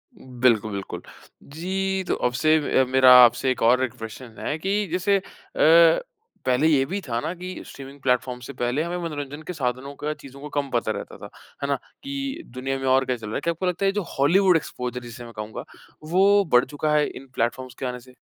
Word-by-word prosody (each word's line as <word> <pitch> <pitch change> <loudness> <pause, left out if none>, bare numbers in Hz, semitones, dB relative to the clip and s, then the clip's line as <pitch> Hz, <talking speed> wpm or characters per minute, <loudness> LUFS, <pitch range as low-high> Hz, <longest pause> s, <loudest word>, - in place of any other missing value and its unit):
बिल्कुल, 125 - +1
बिल्कुल। 100 -1 -5 0.5
जी, 190 +4 -2
तो - - +1
अबसे 135 +6 +2 0.3
अ, 130 - +2
मेरा 130 -1 +7
आपसे 125 +2 +4
एक 130 - -3
और 125 +3 +4
एक 125 - -2
प्रश्न 115 +3 -8
है 150 - -2
कि 200 +3 0
जैसे 185 +3 +2
अ, 195 - -4 1.2
पहले 130 +4 +3
ये 145 -4 +4
भी 195 +7 -3
था 115 -1 -1
ना 165 - -3
कि 180 +1 -7
स्ट्रीमिंग 140 +1 -11
प्लेटफॉर्म 125 -1 0
से 135 +3 -8
पहले 125 +6 0
हमें 175 +1 -3
मनोरंजन 145 -2 -5
के 180 - -4
साधनों 130 -2 -3
का 150 +1 -2
चीज़ों 140 -2 -13
को 150 - -7
कम 145 -1 -2
पता 115 -2 +1
रहता 100 - -6
था। - - -10 0.3
है - - 0
ना? 140 - +1 0.3
कि 275 -1 -4
दुनिया 130 +2 -4
में 135 - -4
और 130 +1 +4
क्या 125 - 0
चल 110 -2 -9
रहा 105 - -5
है। - - -2
क्या 170 - 0
आपको 170 +3 -4
लगता 180 +2 0
है - - +4
ये - - -1
जो 205 - -1 0.2
हॉलीवुड 180 +7 +4
एक्सपोज़र 125 -5 -5
जिसे 120 0 -9
मैं 115 - -11
कहूँगा 105 +1 -6 0.5
वो 200 +2 +5
बढ़ 125 0 +6
चुका 150 +2 -2
है 150 -1 +4
इन 135 - -10
प्लेटफॉर्म्स 125 +2 -2
के 135 - -3
आने 125 0 -4
से? 125 +1 -17
135 Hz, 220 wpm, -24 LUFS, 125-170 Hz, 1.2 s, मेरा